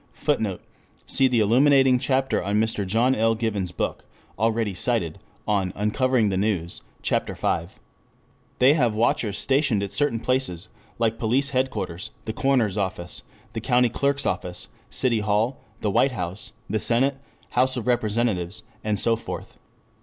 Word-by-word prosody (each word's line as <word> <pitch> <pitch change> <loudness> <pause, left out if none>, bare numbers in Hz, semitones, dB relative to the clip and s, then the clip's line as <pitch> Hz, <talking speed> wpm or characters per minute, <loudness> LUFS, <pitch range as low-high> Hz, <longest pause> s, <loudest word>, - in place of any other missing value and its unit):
[Footnote: 110 -11 -1 0.4
See 135 -1 +3
the 120 -3 +2
illuminating 130 +3 +5
chapter 135 +1 +1
in 100 +2 0
Mr. 110 -3 0
John 115 +6 +3
L. 115 -1 +2
Given's 105 -5 -2
book, - - -3 0.4
already 110 -2 +1
cited, 95 -5 -1 0.3
on 95 -3 +1
"Uncovering 110 +2 +1
the 95 - -1
News," 95 -4 -1 0.2
Ch. - - -1
V.] 85 - 0 0.9
They 130 +3 +6
have 120 -8 +2
watchers 110 -2 +1
stationed 135 -7 +2
at 100 - -4
certain 145 -6 +1
places, 110 -7 -1 0.3
like 115 -1 0
Police 130 +5 +1
Headquarters, 130 -9 -2 0.2
the 110 - -3
Coroner's 115 -6 +1
Office, 90 -3 -4 0.3
the - - -4
County 125 0 +3
Clerk's 140 +3 0
Office, 90 -1 -3 0.2
City 120 -4 +1
Hall, 105 +4 0 0.2
the 105 - 0
White 130 +6 +3
House, 90 -2 -5
the 110 - -1
Senate, 130 +5 +2 0.3
House 130 +1 +2
of 120 - -3
Representatives, 110 -6 0 0.2
and 105 -1 0
so 115 -1 +3
forth. 115 - -8
115 Hz, 145 wpm, -24 LUFS, 105-130 Hz, 0.9 s, They